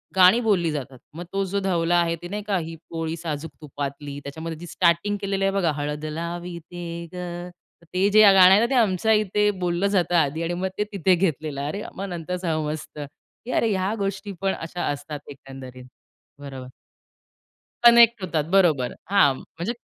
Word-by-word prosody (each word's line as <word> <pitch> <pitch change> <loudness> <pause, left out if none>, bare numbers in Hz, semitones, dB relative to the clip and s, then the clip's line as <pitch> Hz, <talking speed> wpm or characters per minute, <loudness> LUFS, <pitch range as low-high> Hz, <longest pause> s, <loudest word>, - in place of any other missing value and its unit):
गाणी 185 +5 +7
बोलली 190 -8 +2
जातात. 135 -3 -6
मग 170 +3 -7
तो 195 0 0
जो 200 +2 -2
धवला 175 -3 +1
आहे 170 -1 +1
ते 175 - -6
नाही 210 +2 -4
का, 200 -2 +1
ही 165 -1 -5
पोळी 165 0 -3
साजूक 160 -1 -5
तुपातली 145 -1 -6
त्याच्यामध्ये 160 +3 -6
जी 175 - -9
स्टार्टिंग 175 +4 +1
केलेली 195 -1 -1
आहे 195 - +2
बघा, 180 -5 +1
हळद 150 +1 -4
लावीते 170 +1 -6
गं. 175 0 -6 0.3
तर - - -20
ते 190 +2 +2
जे 215 +1 +6
गाणं 185 -1 +8
आहे 195 - +7
ना, 235 - +3
ते 270 - 0
आमच्या 215 -1 +2
इथे 210 0 +2
बोललं 175 +3 +1
जातं 175 -1 +2
आधी 160 0 +1
आणि 170 +1 -2
मग 185 +2 -2
ते 210 - +1
तिथे 185 -1 +3
घेतलेलं. 155 -5 -1
अरे 200 +8 -4
मग 195 - -4
नंतर 175 +1 -4
समजतं 155 -3 -3 0.4
की 250 - -5
अरे 230 - +2
ह्या 190 +1 0
गोष्टी 200 +1 -3
पण 195 -1 +1
अशा 170 +2 -5
असतात 145 +1 -4
एकंदरीत. 135 -2 -11 0.5
बरोबर. 135 -3 -8 1.2
कनेक्ट 235 -2 +7
होतात, 165 -4 -1
बरोबर. 155 -10 +3 0.2
हां, 195 -9 +5
म्हणजे 175 +8 -5
175 Hz, 180 wpm, -24 LUFS, 155-195 Hz, 1.2 s, गाणं